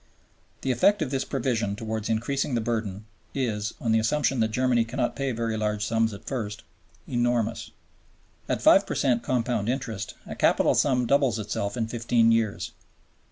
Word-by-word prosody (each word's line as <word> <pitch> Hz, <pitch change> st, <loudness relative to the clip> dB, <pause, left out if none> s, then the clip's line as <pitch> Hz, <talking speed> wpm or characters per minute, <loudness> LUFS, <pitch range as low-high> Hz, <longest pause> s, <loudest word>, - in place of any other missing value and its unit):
The 135 Hz, -, 0 dB
effect 185 Hz, -, +3 dB
of 135 Hz, -, -5 dB
this 135 Hz, -1 st, 0 dB
provision 115 Hz, -6 st, -1 dB
towards 110 Hz, 0 st, -4 dB
increasing 125 Hz, +4 st, 0 dB
the -, -, +2 dB
burden 110 Hz, -3 st, -3 dB, 0.3 s
is, 110 Hz, -6 st, -2 dB
on 115 Hz, -, 0 dB
the 110 Hz, -, +4 dB
assumption 135 Hz, +3 st, +1 dB
that 110 Hz, -, +3 dB
Germany 125 Hz, 0 st, +2 dB
cannot 120 Hz, +2 st, -2 dB
pay 135 Hz, -1 st, -1 dB
very 115 Hz, -1 st, -2 dB
large 105 Hz, -1 st, -1 dB
sums 115 Hz, 0 st, +1 dB
at 100 Hz, -, -10 dB
first, 105 Hz, -6 st, -4 dB, 0.4 s
enormous. 120 Hz, -2 st, 0 dB, 0.8 s
At -, -, -1 dB
5 -, -, +6 dB
per -, -, -3 dB
cent 125 Hz, -3 st, +2 dB
compound 120 Hz, -3 st, 0 dB
interest 115 Hz, -6 st, -3 dB
a -, -, -6 dB
capital -, -, +3 dB
sum 125 Hz, -3 st, +2 dB
doubles 135 Hz, -2 st, +2 dB
itself 100 Hz, -1 st, -3 dB
in 115 Hz, -2 st, 0 dB
fifteen 115 Hz, 0 st, +2 dB
years. 115 Hz, -3 st, 0 dB
115 Hz, 165 wpm, -26 LUFS, 110-125 Hz, 0.8 s, 5